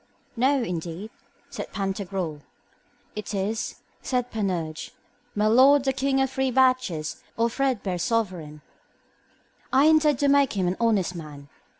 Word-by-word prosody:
No, 260 Hz, +2 st, +2 dB
indeed, 175 Hz, +2 st, -5 dB, 0.4 s
said -, -, -6 dB
Pantagruel. 190 Hz, -5 st, -3 dB, 0.7 s
It 210 Hz, 0 st, -5 dB
is, 215 Hz, +5 st, -3 dB, 0.2 s
said 250 Hz, -2 st, -1 dB
Panurge, 175 Hz, -7 st, -3 dB, 0.4 s
my 210 Hz, +1 st, +1 dB
lord 260 Hz, +5 st, +6 dB
the 270 Hz, -1 st, +1 dB
king 270 Hz, +1 st, +1 dB
of 270 Hz, -, +3 dB
the -, -, -15 dB
three 265 Hz, 0 st, +1 dB
batches, 255 Hz, -, +1 dB, 0.2 s
or 230 Hz, +1 st, +2 dB
threadbare 225 Hz, -9 st, -1 dB
sovereign. 180 Hz, -, -2 dB, 1.1 s
I 270 Hz, +2 st, +5 dB
intend 310 Hz, -3 st, +5 dB
to 285 Hz, -, +1 dB
make 280 Hz, -1 st, +4 dB
him 190 Hz, -3 st, 0 dB
an 180 Hz, -, -1 dB
honest 215 Hz, -6 st, +2 dB
man. 150 Hz, -4 st, -9 dB
220 Hz, 135 wpm, -25 LUFS, 180-260 Hz, 1.1 s, lord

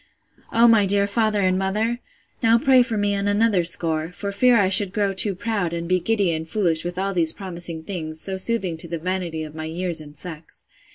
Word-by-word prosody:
O 230 Hz, +1 st, +5 dB
my 220 Hz, -4 st, +4 dB
dear 200 Hz, +1 st, +2 dB
father 210 Hz, 0 st, 0 dB
and 185 Hz, 0 st, +1 dB
mother! 215 Hz, +5 st, -1 dB, 0.4 s
now 230 Hz, -1 st, +4 dB
pray 260 Hz, +1 st, +4 dB
for 235 Hz, -3 st, -1 dB
me 205 Hz, 0 st, +1 dB
on 200 Hz, 0 st, -2 dB
another 205 Hz, -2 st, +2 dB
score; 165 Hz, -1 st, 0 dB
for 200 Hz, +2 st, -5 dB
fear 245 Hz, +4 st, +4 dB
I 200 Hz, -3 st, +3 dB
should 195 Hz, 0 st, +5 dB
grow 200 Hz, -2 st, 0 dB
too 195 Hz, +1 st, +1 dB
proud, 200 Hz, -4 st, -2 dB
and 170 Hz, 0 st, -4 dB
be 185 Hz, +1 st, +2 dB
giddy 200 Hz, -2 st, 0 dB
and 160 Hz, 0 st, -5 dB
foolish 170 Hz, -6 st, +1 dB
with 175 Hz, +1 st, -5 dB
all 195 Hz, +1 st, -1 dB
these 165 Hz, -3 st, +2 dB
promising 170 Hz, -4 st, -4 dB
things, 160 Hz, -4 st, -5 dB
so 190 Hz, +3 st, -2 dB
soothing 190 Hz, -4 st, -2 dB
to 165 Hz, -, -3 dB
the 170 Hz, 0 st, -4 dB
vanity 175 Hz, -2 st, -3 dB
of 155 Hz, -1 st, -9 dB
my 160 Hz, 0 st, -6 dB
years 170 Hz, 0 st, -3 dB
and 150 Hz, -1 st, -13 dB
sex. 160 Hz, -1 st, -8 dB
190 Hz, 220 wpm, -22 LUFS, 170-205 Hz, 0.4 s, O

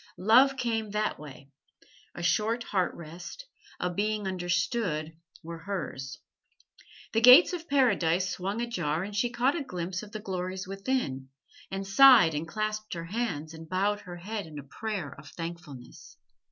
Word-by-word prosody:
Love 255 Hz, +7 st, +5 dB
came 225 Hz, -4 st, -1 dB
that 210 Hz, +1 st, -1 dB
way 140 Hz, -2 st, -12 dB, 0.6 s
a 175 Hz, -, -6 dB
short 220 Hz, +7 st, +1 dB
heart 185 Hz, -5 st, 0 dB
rest, 170 Hz, -, -9 dB, 0.3 s
a 180 Hz, -, 0 dB
being 205 Hz, +3 st, -1 dB
understood, 175 Hz, -3 st, -1 dB, 0.3 s
were 165 Hz, 0 st, -7 dB
hers. 145 Hz, -9 st, -5 dB, 1.0 s
The 225 Hz, -, +2 dB
gates 255 Hz, -, +9 dB
of 340 Hz, -1 st, -6 dB
Paradise 190 Hz, -10 st, +2 dB
swung 195 Hz, +5 st, -3 dB
ajar 170 Hz, -8 st, -2 dB
and 205 Hz, +1 st, -6 dB
she 240 Hz, +4 st, +1 dB
caught 245 Hz, +4 st, +1 dB
a 325 Hz, -, -2 dB
glimpse 180 Hz, -5 st, -4 dB
of 210 Hz, -1 st, -11 dB
the 215 Hz, -, -5 dB
glories 185 Hz, -1 st, -4 dB
within, 195 Hz, -, -2 dB, 0.4 s
and 195 Hz, 0 st, -4 dB
sighed 225 Hz, -3 st, +7 dB
and 150 Hz, +2 st, -3 dB
clasped 215 Hz, +1 st, -3 dB
her 165 Hz, 0 st, -5 dB
hands 165 Hz, -6 st, -3 dB
and 160 Hz, 0 st, -11 dB
bowed 200 Hz, +3 st, +1 dB
her 180 Hz, -4 st, -9 dB
head 205 Hz, +1 st, -5 dB
in 155 Hz, -2 st, -10 dB
a 145 Hz, -, -7 dB
prayer 175 Hz, 0 st, -5 dB
of 145 Hz, -, -13 dB
thankfulness. 165 Hz, -7 st, -9 dB
190 Hz, 155 wpm, -28 LUFS, 165-220 Hz, 1.0 s, gates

